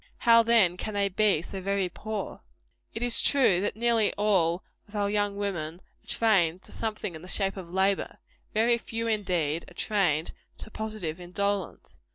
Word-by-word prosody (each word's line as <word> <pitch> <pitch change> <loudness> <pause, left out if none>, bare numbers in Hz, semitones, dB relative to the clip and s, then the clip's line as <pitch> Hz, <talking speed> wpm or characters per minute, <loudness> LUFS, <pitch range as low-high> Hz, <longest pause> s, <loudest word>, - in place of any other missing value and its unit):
How, 230 -1 +6
then, 225 -6 +3
can 215 +2 -5
they 200 -1 +1
be 195 -4 +2
so 190 +1 -6
very 195 0 0
poor? 210 +3 -6 0.5
It 225 - -3
is 240 -1 +5
true, 250 -11 +3
that 205 - -2
nearly 230 -1 +2
all 190 -4 +1 0.2
of 210 - -13
our 205 -1 0
young 205 -1 0
women 170 -6 -3 0.3
are - - -26
trained 185 -6 +2
to - - -8
something 215 -5 -3
in 160 - -9
the 180 - -11
shape 195 +1 +2
of 185 -3 -8
labor. 190 +2 0 0.3
Very 235 +2 +2
few, 230 0 -4
indeed, 180 -8 -1
are 175 - -18
trained 175 -8 0 0.2
to 220 - -10
positive 215 -8 -4
indolence. 195 +2 -3
200 Hz, 175 wpm, -27 LUFS, 180-220 Hz, 0.5 s, How